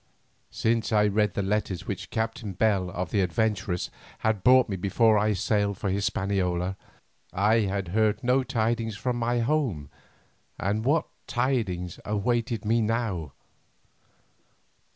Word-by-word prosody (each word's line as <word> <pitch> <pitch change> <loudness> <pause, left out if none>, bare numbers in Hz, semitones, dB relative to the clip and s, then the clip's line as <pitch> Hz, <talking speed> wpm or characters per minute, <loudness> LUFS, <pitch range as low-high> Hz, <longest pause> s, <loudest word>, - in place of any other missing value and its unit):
Since 115 0 0
I 105 -1 +4
read 105 0 +1
the 100 - 0
letters 95 -2 -1
which 100 - -5
Captain 110 -2 -3
Bell 95 -2 +1
of 90 -2 -4
the 100 - +2
"Adventuress" 95 -1 -1 0.3
had 110 -4 0
brought 130 0 +6
me 100 - -3
before 110 +4 +3
I 105 +1 +2
sailed 100 0 0
for 100 - -2
Hispaniola, 95 -2 0 0.6
I 105 +5 +3
had 95 -2 -2
heard 105 +3 +1
no 125 +2 +3
tidings 115 -3 -1
from 125 -1 -1
my 120 0 0
home, 115 - -1 0.7
and 105 +4 -1
what 150 +4 +2 0.2
tidings 110 -9 -1
awaited 115 +1 -1
me 115 +2 +2
now? 105 - -1
105 Hz, 130 wpm, -27 LUFS, 95-115 Hz, 0.7 s, brought